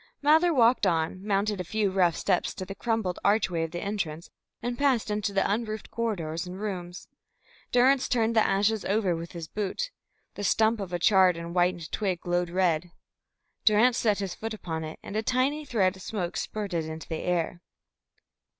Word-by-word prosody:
Mather 315 +4 +4
walked 245 -4 +4
on, 165 +3 0
mounted 205 -1 0
a - - -3
few 205 +2 0
rough 180 -3 +3
steps 185 -3 0
to 185 - -5
the 195 - -6
crumbled 220 -4 -1
archway 200 -5 +2
of 165 - -1
the 175 +1 -5
entrance, 170 -6 -4 0.3
and 245 0 -3
passed 255 -5 +1
into 210 0 -1
the 195 -1 +1
unroofed 215 +1 -3
corridors 175 -8 -2
and 180 +1 -7
rooms. 180 -4 -5 0.6
Durrance 255 +2 +4
turned 230 -1 +1
the 220 - +6
ashes 205 +2 +1
over 195 -3 +1
with 165 +1 -7
his 170 -2 -6
boot. 210 - -3 0.4
The 205 - -6
stump 220 +3 +3
of 195 -3 -5
a 175 - 0
charred 185 -1 +4
and 170 0 -6
whitened 175 -2 +1
twig 190 -5 -1
glowed 175 0 0
red. 175 -2 +1 0.7
Durrance 225 +3 +4
set 210 -3 +2
his 195 -3 -3
foot 225 0 -5
upon 160 -6 -5
it, 155 0 -7
and 200 - -7
a 215 - +1
tiny 260 +6 0
thread 195 -8 +1
of 190 - -13
smoke 180 -3 -4
spurted 195 -7 -3
into 160 0 -7
the 160 - -4
air. 175 -1 -1
195 Hz, 185 wpm, -27 LUFS, 175-220 Hz, 0.7 s, the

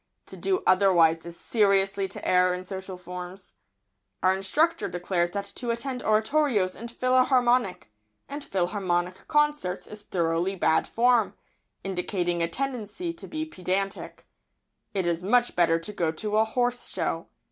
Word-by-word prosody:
To - - -9
do 380 -1 -1
otherwise 170 -4 +4
is 170 0 -7
seriously 195 -2 +2
to - - -6
err 180 0 +4
in 180 0 -7
social 190 0 -6
forms. 180 +1 -8 0.7
Our 185 0 +4
instructor 310 - +1
declares 175 0 -1
that 200 +2 -4
to 245 - -3
attend 245 +2 -2
oratorios 215 -3 +2
and 235 +1 -8
philharmonic 255 -4 +2 1.4
concerts 295 -11 +1
is 210 0 -10
thoroughly 175 0 -1
bad 170 - +2
form, 240 -2 +2 0.5
indicating 180 -2 -1
a 165 - +2
tendency 270 - -3
to 340 - -11
be 315 0 -3
pedantic. 195 - -3 0.7
It 190 -2 0
is 170 0 0
much 240 +6 +2
better 165 -2 +4
to 190 +6 -6
go 170 -5 0
to 210 +6 -2
a 220 - +5
horse 245 +2 -1
show. - - -2
195 Hz, 135 wpm, -26 LUFS, 180-245 Hz, 1.4 s, a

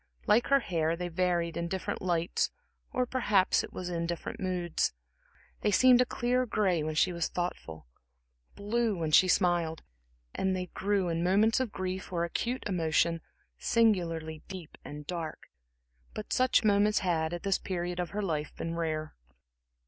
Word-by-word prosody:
Like 220 +3 +4
her 275 0 +4
hair, 165 -5 0
they 175 +1 -4
varied 170 -1 0
in 170 - -2
different 190 +1 -3
lights, 170 -2 0 0.4
or 255 - +1
perhaps 210 -7 +2
it - - -8
was 180 - -5
in 170 -1 -2
different 170 -1 -5
moods. 180 -3 -1 0.7
They 210 - +1
seemed 250 +5 +6
a - - +4
clear 250 +1 0
gray 190 -7 +1
when 155 0 -3
she 180 +3 +3
was 170 -1 -1
thoughtful, 80 - -5 0.7
blue 215 0 0
when 160 -2 -2
she 185 - +7
smiled, 175 -4 +1 0.5
and 190 0 0
they 180 -1 -4
grew, 200 -1 0
in 165 0 -1
moments 205 +6 +3
of 255 -5 -1
grief 185 0 -4
or 170 -2 0
acute 240 +9 -2
emotion, 165 -2 +1 0.4
singularly 165 -8 +1
deep 185 -4 -9
and 150 0 -8
dark. 165 -2 -6 0.6
But 215 - -4
such 255 -1 +3
moments 210 0 +3
had, 160 -3 0
at 175 0 -5
this 195 -1 +1
period 175 -1 -3
of 175 -2 -2
her 210 +5 -3
life, 155 -5 -2
been 165 - -4
rare. 155 -2 -2
180 Hz, 165 wpm, -30 LUFS, 165-205 Hz, 0.7 s, she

